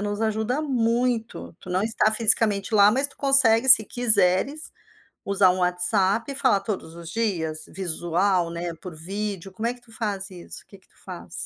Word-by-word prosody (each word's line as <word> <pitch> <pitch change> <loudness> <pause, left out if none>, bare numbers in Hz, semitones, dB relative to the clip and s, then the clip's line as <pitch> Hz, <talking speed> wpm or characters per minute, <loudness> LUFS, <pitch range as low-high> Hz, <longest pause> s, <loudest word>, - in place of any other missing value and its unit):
nos 205 0 -4
ajuda 220 +6 -2
muito. 230 - -2
Tu - - -15
não 185 +2 -1
está 220 0 0
fisicamente 215 -2 +1
lá, 205 -1 +5
mas 270 +4 +1
tu 280 - -17
consegue, 265 -3 +4
se 250 -4 +8
quiseres, 225 - +1 0.5
usar 195 -1 +2
um 185 - -4
WhatsApp 190 +5 0
e - - -7
falar 255 -7 +1
todos 190 -7 -6
os 170 -1 -10
dias, 170 -8 -2
visual, 175 0 -1
né, 170 0 -5
por 180 -3 -9
vídeo. 195 +3 -6
Como 220 +4 -6
é 240 - -1
que 245 - -19
tu 230 -2 -19
faz 205 -4 -2
isso? 180 -2 -10
O - - -42
que 200 - -16
que 190 - -29
tu - - -28
faz? - - -10
205 Hz, 190 wpm, -23 LUFS, 185-230 Hz, 0.5 s, se